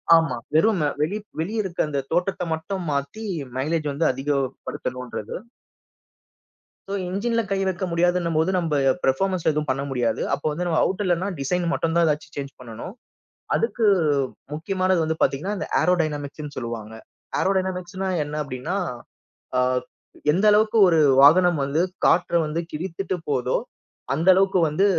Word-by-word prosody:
ஆமா. 160 -6 +2 0.2
வெறும் 185 +4 +3 0.2
வெளி 165 +8 0 0.2
வெளிய 210 +7 -1
இருக்குற 180 -4 -1
அந்த 140 -2 -2
தோற்றத்த 180 +2 0
மட்டும் 180 +4 -4
மாத்தி 140 +10 -3 0.3
மைலேஜ் 150 +3 -1
வந்து 145 +4 0
அதிகப் 135 0 -1
படுத்தனுன்றது. 125 -4 -5 1.5
சோ, 195 - -4 0.2
இன்ஜின்ல 230 +5 0
கை 195 - +2
வைக்க 185 0 -2
முடியாதுன்னம்போது, 170 -1 +2
நம்ம 170 -3 -1 0.3
பெர்ஃபார்மன்ஸ்ல 180 +6 +1
எதுவும் 150 -1 -2
பண்ண 135 +1 -2
முடியாது. 125 -3 0
அப்ப - - -2
வந்து 170 +4 -3
நம்ம 165 -2 +1
அவுட் 190 +2 0
இல்லனா 180 +1 +1
டிசைன் 175 +6 0
மட்டும் 165 0 -1
தான் 170 0 +4
எதாச்சும் 150 -1 -2
சேஞ்ச் 140 -1 -5
பண்ணனும். 120 - -8 0.6
அதுக்கு 240 - 0 0.7
முக்கியமானது 185 +3 0
வந்து 160 0 -1
பாத்தீங்கன்னா 175 +10 +1
இந்த - - -4
ஏரோடைனமிக்ஸ்ன்னு 150 -4 -1
சொல்லுவாங்க. 115 -3 -5 0.5
ஏரோடைனமிக்ஸ்ன்னா 190 0 -1
என்ன 145 +1 -6
அப்டின்னா, 130 +6 -4 0.8
ஆ - - +4 0.7
எந்த 190 +6 +1
அளவுக்கு 215 +2 +3
ஒரு 165 -2 +4 0.2
வாகனம் 165 +2 +6
வந்து 140 +4 +1 0.2
காற்றை 175 0 +3
வந்து 155 +2 -2
கிழித்துட்டு 185 +4 -3
போதோ, 130 -4 +1 0.6
அந்த 165 +5 -2
அளவுக்கு 190 0 +3
வந்து 155 +7 +2
165 Hz, 135 wpm, -23 LUFS, 145-185 Hz, 1.5 s, வாகனம்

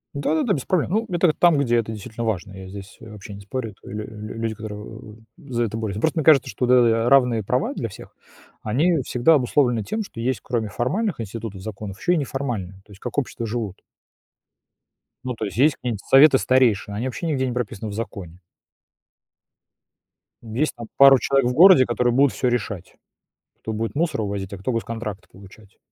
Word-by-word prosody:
Да-да-да. 160 - 0
Без 135 - -2
проблем. 180 -2 0
Ну, 220 +3 +1
это 175 -2 +2
там, 170 -4 +4
где 120 -4 +1
это 110 -1 0
действительно 110 +2 -6
важно. 100 -2 -3
Я 95 -1 -9
здесь, 100 0 -10
э, 110 - -11
вообще 105 -1 -10
не 100 - -10
спорю. 115 +2 -5
Это 95 - -14
лю 105 0 -5
лю 105 0 -8
люди, 115 -1 -2
которые 110 0 -9 0.2
за 125 -6 -3
это 110 0 -5
борются. 105 -3 -3
Ну, - - -6
просто 160 +1 +1
мне - - 0
кажется, 150 -5 +5
что 115 +5 -2
д 125 - +3
э, 115 -2 +4
а - - +2
равные 125 -5 +4
права 125 +7 -1
для 115 - -4
всех, - - -13 0.5
они 150 +9 +1
всегда 125 +7 +3
обусловлены 125 -4 +2
тем, 220 - -3
что 115 - -9
есть, 130 +2 -1
кроме 115 -4 -2
формальных 185 - -2
институтов, 110 -2 -6
законов, 100 -1 -7
ещё 180 - +1
и - - +2
неформальные. 125 -10 -3
То 105 - -20
есть 100 - -14
как 125 - -6
общества 120 -3 -2
живут. 110 -4 -4 1.4
Ну, 125 -1 -3
то 110 - -4
есть 100 - -7
есть 145 +3 +4
какие-нибудь 115 -5 -4
советы 135 +1 +7
старейшин. 125 -7 +2
Они 115 +5 -3
вообще 145 +6 -4
нигде 130 -4 0
не 125 - -3
прописаны 110 -3 -4
в - - -6
законе. 100 -5 -7 2.0
В 110 -1 -10
есть 150 +6 0
там 115 -1 -9
пару 135 -1 +8
человек 135 -3 +2
в 125 - -1
городе, 170 -3 +7
которые 120 0 0
будут 140 +1 +3
всё 125 - -1
решать. 100 -6 -4 0.7
Кто 110 - -4
будет 115 +3 -3
мусор 160 -6 0
увозить, 100 -2 -4
а - - -6
кто 95 +7 -3
госконтракты 115 -3 -5
получать. 100 +1 -17
115 Hz, 200 wpm, -22 LUFS, 105-135 Hz, 2.0 s, пару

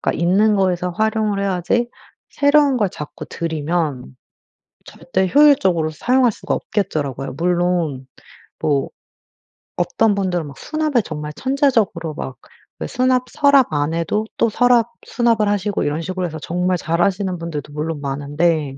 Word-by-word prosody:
그니까 - - -1
있는 200 +5 +3
거에서 180 -2 +1
활용을 215 +1 0
해야지. 200 +5 0 0.4
새로운 285 -1 +3
걸 210 -5 +1
자꾸 150 -2 -8
들이면 155 - -3 0.7
절대 185 +1 -2
효율적으로 230 - +4
사용할 250 - +2
수가 - - -3
없겠더라고요. 145 - -3
물론 175 -6 0 0.5
뭐 140 -3 0 0.9
어떤 205 +4 +1
분들은 180 -5 -1
막 140 - -11
수납에 310 -5 0
정말 150 -1 -6
천재적으로 240 - 0
막 130 - -6 0.4
그 - - -3
수납 255 0 +1
서랍 280 - +4
안에도 165 +8 0
또 230 - +3
서랍 240 0 +3 0.2
수납을 230 -3 +2
하시고 205 0 -1
이런 150 +2 -1
식으로 185 +1 -3
해서 160 -1 -7
정말 180 +4 -1
잘하시는 180 +3 0
분들도 150 -3 -6
물론 150 0 -3
많은데 145 +1 -1
180 Hz, 315 characters per minute, -19 LUFS, 155-220 Hz, 0.9 s, 효율적으로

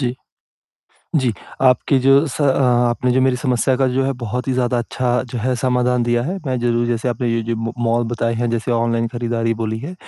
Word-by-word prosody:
जी। 125 -2 -1 1.0
जी, 130 -5 +2 0.3
आपके 130 +1 +3
जो 135 +3 +4
स 145 - -4
अ, 145 - +3 0.4
आपने 125 +1 0
जो 130 +1 +2
मेरी 130 -1 +2
समस्या 130 0 +1
का, 135 0 +2
जो 130 +1 0
है, 135 - 0
बहुत 120 +3 -3
ही 130 - +1
ज़्यादा 125 -1 0
अच्छा, 125 +1 -1
जो 125 - -3
है, 125 +3 0
समाधान 125 0 +1
दिया 120 0 +1
है। 185 +7 -3
मैं 130 -1 -1
ज़रूर, 120 0 +1
जैसे 120 +1 -1
आपने 120 +1 -2
ये 115 - 0
जो 115 - 0
म 115 +1 -3
मॉल 115 +1 +2
बताए 115 0 -1
हैं, 120 +1 -1
जैसे 115 +1 -2
ऑनलाइन 115 0 +1
खरीदारी 115 -1 -1
बोली 110 0 -2
है, 150 +8 -6
120 Hz, 220 wpm, -19 LUFS, 115-130 Hz, 1.0 s, जो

